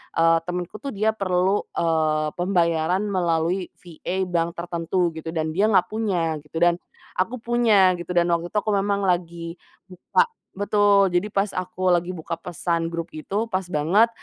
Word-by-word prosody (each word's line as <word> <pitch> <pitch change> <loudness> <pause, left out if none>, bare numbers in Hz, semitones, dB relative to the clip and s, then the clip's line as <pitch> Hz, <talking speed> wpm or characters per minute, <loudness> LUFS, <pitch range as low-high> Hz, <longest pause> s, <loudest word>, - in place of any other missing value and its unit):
eee, 165 0 +5
temenku 180 +3 -4
tuh 275 +5 -5
dia 215 +2 +1
perlu, 190 0 +1
eee, 155 -2 +1
pembayaran 175 -1 +1
melalui 175 -1 0 0.2
VA 180 +2 -4
bank 170 -1 0
tertentu 170 +1 -1
gitu, 160 +1 -6
dan 160 -1 0
dia 195 +6 +2
nggak 195 -4 +3
punya, 180 -8 0
gitu, 160 +2 -5
dan 175 0 +4 0.4
aku 190 +7 0
punya, 225 -6 +4
gitu. 175 +1 -5
Dan 175 0 +3
waktu 170 0 0
itu - - 0
aku 215 - -3
memang 200 0 +1
lagi 170 -2 -1 0.3
buka 460 - +1 0.3
betul. 205 0 +4
Jadi 180 +4 +1
pas 195 0 0
aku 185 0 -1
lagi 175 0 +1
buka 160 +1 -5
pesan 170 0 -2
grup 170 0 -5
itu, 195 +8 -2
pas 190 -4 -1
banget, 180 +9 +3
180 Hz, 165 wpm, -23 LUFS, 165-195 Hz, 0.4 s, eee